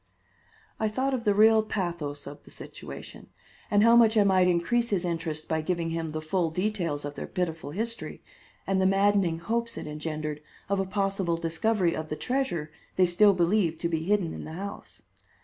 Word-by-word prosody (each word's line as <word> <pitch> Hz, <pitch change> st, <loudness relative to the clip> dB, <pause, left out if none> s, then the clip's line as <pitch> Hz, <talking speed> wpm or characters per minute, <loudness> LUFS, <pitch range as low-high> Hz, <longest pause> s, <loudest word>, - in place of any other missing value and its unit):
I 220 Hz, -, +1 dB
thought 260 Hz, +5 st, -1 dB
of 245 Hz, -3 st, -2 dB
the 205 Hz, -, +4 dB
real 220 Hz, +1 st, +6 dB
pathos 170 Hz, -9 st, -3 dB
of 145 Hz, +1 st, -9 dB
the -, -, -17 dB
situation, -, -, -9 dB, 0.4 s
and 205 Hz, -2 st, +4 dB
how 230 Hz, +1 st, +7 dB
much 230 Hz, -2 st, +5 dB
I 210 Hz, -, +6 dB
might 190 Hz, -2 st, +4 dB
increase 235 Hz, +7 st, +1 dB
his 190 Hz, -3 st, 0 dB
interest 165 Hz, -2 st, -3 dB
by 160 Hz, -1 st, 0 dB
giving 170 Hz, 0 st, -1 dB
him 165 Hz, -1 st, -2 dB
the 155 Hz, 0 st, -5 dB
full 170 Hz, +1 st, 0 dB
details 170 Hz, -5 st, -2 dB
of 145 Hz, -, -5 dB
their -, -, -6 dB
pitiful 165 Hz, -5 st, -3 dB
history, 230 Hz, +8 st, -3 dB, 0.4 s
and 195 Hz, -1 st, +1 dB
the 190 Hz, -, +4 dB
maddening 195 Hz, -3 st, +3 dB
hopes 230 Hz, +6 st, -2 dB
it -, -, -5 dB
engendered 150 Hz, 0 st, -4 dB, 0.3 s
of 200 Hz, -1 st, +1 dB
a 195 Hz, -, 0 dB
possible 195 Hz, -3 st, 0 dB
discovery 170 Hz, +2 st, +1 dB
of 155 Hz, 0 st, -5 dB
the 150 Hz, -, -2 dB
treasure 245 Hz, -, -2 dB, 0.2 s
they 185 Hz, -, +5 dB
still 200 Hz, +4 st, +5 dB
believed 175 Hz, -2 st, +1 dB
to 170 Hz, -, 0 dB
be 160 Hz, -1 st, -1 dB
hidden 185 Hz, -1 st, +1 dB
in -, -, -7 dB
the 160 Hz, -, -8 dB
house. 200 Hz, +4 st, -8 dB
180 Hz, 190 wpm, -27 LUFS, 160-210 Hz, 0.4 s, how